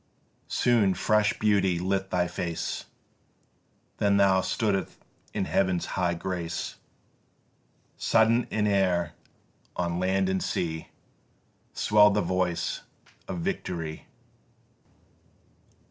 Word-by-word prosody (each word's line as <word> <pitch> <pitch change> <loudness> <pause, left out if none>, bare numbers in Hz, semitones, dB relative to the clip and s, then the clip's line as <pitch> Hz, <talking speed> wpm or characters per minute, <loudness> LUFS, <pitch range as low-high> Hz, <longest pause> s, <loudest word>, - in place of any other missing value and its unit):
Soon 110 -6 +2
fresh 105 -1 +2
beauty 100 -4 +2
lit 95 +2 -1
thy 90 -1 +1
face, 85 -1 -4 1.1
Then 100 -1 +3
thou 95 -1 +4
stood'st 100 -1 -1 0.4
in 100 -3 -1
Heaven's 95 -3 +1
high 90 -2 -1
grace: 85 -1 -4 1.2
Sudden 115 +2 +3
in 105 -1 0
air 90 -5 +1 0.6
on 85 -1 -1
land 95 +1 +1
and 95 0 0
sea 80 -2 -2 0.9
Swell'd 105 -1 +5
the 105 - +3
voice 90 -1 -1 0.5
of 175 - -4
victory. 85 - -4
95 Hz, 95 wpm, -27 LUFS, 90-105 Hz, 1.2 s, Swell'd